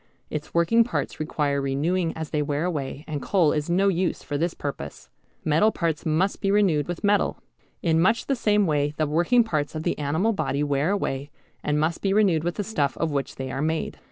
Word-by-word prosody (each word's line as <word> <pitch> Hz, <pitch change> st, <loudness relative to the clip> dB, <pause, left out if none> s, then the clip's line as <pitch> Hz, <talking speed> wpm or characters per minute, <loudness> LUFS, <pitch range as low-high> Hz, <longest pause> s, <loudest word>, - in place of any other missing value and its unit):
Its 150 Hz, -1 st, -4 dB
working 170 Hz, +8 st, +4 dB
parts 245 Hz, -, -3 dB
require 145 Hz, -2 st, 0 dB
renewing 160 Hz, +6 st, 0 dB
as 160 Hz, -1 st, -5 dB
they 150 Hz, -, +1 dB
wear 145 Hz, +2 st, -1 dB
away, 145 Hz, -3 st, -3 dB
and 150 Hz, -3 st, -3 dB
coal 175 Hz, -3 st, +3 dB
is 150 Hz, +1 st, -2 dB
no 190 Hz, +3 st, +3 dB
use 185 Hz, -1 st, 0 dB
for 145 Hz, -, -4 dB
this 165 Hz, +4 st, -1 dB
purpose. 145 Hz, -1 st, -6 dB, 0.3 s
Metal 160 Hz, +8 st, +4 dB
parts 165 Hz, -3 st, -2 dB
must 170 Hz, +6 st, +1 dB
be 195 Hz, -, +1 dB
renewed 190 Hz, -8 st, +3 dB
with 175 Hz, -1 st, -5 dB
metal. 205 Hz, 0 st, +2 dB, 0.5 s
In 165 Hz, -1 st, +3 dB
much 225 Hz, +6 st, +2 dB
the 275 Hz, -, 0 dB
same 210 Hz, -4 st, +2 dB
way 150 Hz, -2 st, 0 dB
the 155 Hz, -, +2 dB
working 175 Hz, +11 st, +3 dB
parts 155 Hz, -8 st, -2 dB
of 155 Hz, -, -3 dB
the -, -, 0 dB
animal 160 Hz, +10 st, +1 dB
body 145 Hz, -7 st, -1 dB
wear 145 Hz, +2 st, +1 dB
away, 145 Hz, -8 st, -2 dB, 0.3 s
and 150 Hz, 0 st, +1 dB
must 160 Hz, +2 st, 0 dB
be 195 Hz, -1 st, +1 dB
renewed 190 Hz, -7 st, +3 dB
with 175 Hz, 0 st, -1 dB
the 205 Hz, -, -2 dB
stuff 155 Hz, -9 st, -1 dB
of 165 Hz, -2 st, -1 dB
which 140 Hz, -1 st, -2 dB
they 130 Hz, -1 st, -5 dB
are 135 Hz, -, -3 dB
made. 160 Hz, +1 st, -2 dB
160 Hz, 215 wpm, -25 LUFS, 150-190 Hz, 0.5 s, working